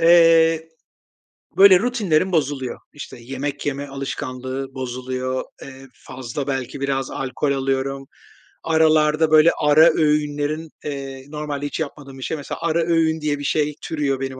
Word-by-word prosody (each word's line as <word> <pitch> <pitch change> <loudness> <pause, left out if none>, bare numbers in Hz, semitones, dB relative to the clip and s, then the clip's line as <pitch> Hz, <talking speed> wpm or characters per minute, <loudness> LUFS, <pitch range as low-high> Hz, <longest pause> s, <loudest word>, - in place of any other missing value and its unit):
Eee, 165 -1 +5 0.9
böyle 190 -2 +8
rutinlerim 195 -7 +1
bozuluyor, 140 -6 -1
işte, 145 - -9
yemek 135 +3 -5
yeme 145 0 -3
alışkanlığı 135 -1 -5
bozuluyor, 130 0 -3 0.2
eee, 135 0 -11
fazla 130 +2 -7
belki 135 0 -3
biraz 135 -1 -1
alkol 135 +2 -2
alıyorum, 135 0 -1 0.6
aralarda 155 -1 +3
böyle 155 +1 +7
ara 150 +2 +6
öğünlerin, 150 +1 0 0.2
eee, 135 -2 -6
normalde 150 -1 -4
hiç 145 - -4
yapmadığım 140 -3 -6
bir 130 - -8
şey, 160 - -3
mesela, 145 - -6
ara 170 0 +1
öğün 160 -1 +1
diye 150 -1 -1
bir - - -6
şey 150 0 0
türüyor 140 -4 -2
benim 135 -1 -5
145 Hz, 140 wpm, -21 LUFS, 135-160 Hz, 0.9 s, böyle